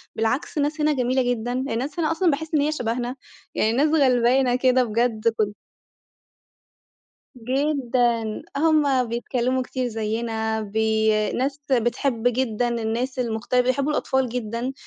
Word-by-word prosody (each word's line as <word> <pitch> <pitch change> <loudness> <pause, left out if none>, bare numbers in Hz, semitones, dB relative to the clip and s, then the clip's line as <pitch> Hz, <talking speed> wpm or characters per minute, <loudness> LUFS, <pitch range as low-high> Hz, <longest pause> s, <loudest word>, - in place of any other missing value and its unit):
بالعكس، 235 +7 -1
الناس 300 +2 0
هنا 300 0 +3
جميلة 255 0 +1
جدًا، 240 0 -2
الناس 265 +4 -3
هنا 320 0 +1
أصلًا 335 0 +2
باحس 315 +3 -4
إن 295 - +3
هي 300 +1 +1
شبهنا، 245 -2 -2 0.4
يعني 220 - +2
ناس 285 +6 +2
غلبانة 255 -3 +3
كده 255 0 +3
بجد 230 0 0
كن 210 -1 0 1.8
جدًا، 245 -3 0 0.2
هُم 290 -4 +3
بيتكلموا 245 +2 -1
كتير 255 0 -3
زيّنا 220 0 -2
بي 220 +1 +1 0.2
ناس 275 +3 -2
بتحب 240 0 0
جدًا 245 -1 0
الناس 235 +3 -2
المختلفة، 240 +1 0
بيحبوا 275 +4 0
الأطفال 265 -4 0
جدًا، 240 +2 -3
250 Hz, 130 wpm, -23 LUFS, 230-270 Hz, 1.8 s, هنا